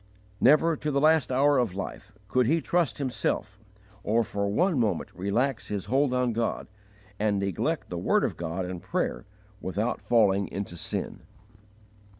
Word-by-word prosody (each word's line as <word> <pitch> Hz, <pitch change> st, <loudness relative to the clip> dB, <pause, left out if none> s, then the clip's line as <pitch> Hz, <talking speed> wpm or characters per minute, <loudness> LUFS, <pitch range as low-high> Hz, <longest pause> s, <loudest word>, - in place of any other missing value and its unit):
Never, 155 Hz, +5 st, +5 dB
to 150 Hz, -, -3 dB
the 140 Hz, -1 st, +1 dB
last 155 Hz, -2 st, +3 dB
hour 140 Hz, +2 st, +4 dB
of 115 Hz, -7 st, -1 dB
life, 100 Hz, +2 st, -6 dB, 0.2 s
could 125 Hz, +3 st, +2 dB
he 160 Hz, +5 st, +3 dB
trust 160 Hz, -9 st, 0 dB
himself, 120 Hz, -6 st, -2 dB, 0.4 s
or 115 Hz, +3 st, +2 dB
for 100 Hz, -1 st, -2 dB
one 165 Hz, -, +2 dB
moment 110 Hz, -3 st, -1 dB
relax 110 Hz, +8 st, -1 dB
his 100 Hz, -3 st, -3 dB
hold 135 Hz, +1 st, +2 dB
on 125 Hz, -2 st, +1 dB
God, 115 Hz, 0 st, -1 dB, 0.5 s
and 105 Hz, -1 st, +1 dB
neglect 100 Hz, -3 st, -2 dB
the -, -, -3 dB
word -, -, +2 dB
of -, -, -1 dB
God 85 Hz, +2 st, -3 dB
and 90 Hz, -1 st, -6 dB
prayer, -, -, -2 dB, 0.4 s
without 105 Hz, +6 st, -2 dB
falling 100 Hz, -4 st, +3 dB
into 100 Hz, -3 st, -5 dB
sin. -, -, -3 dB
115 Hz, 155 wpm, -27 LUFS, 100-135 Hz, 0.5 s, Never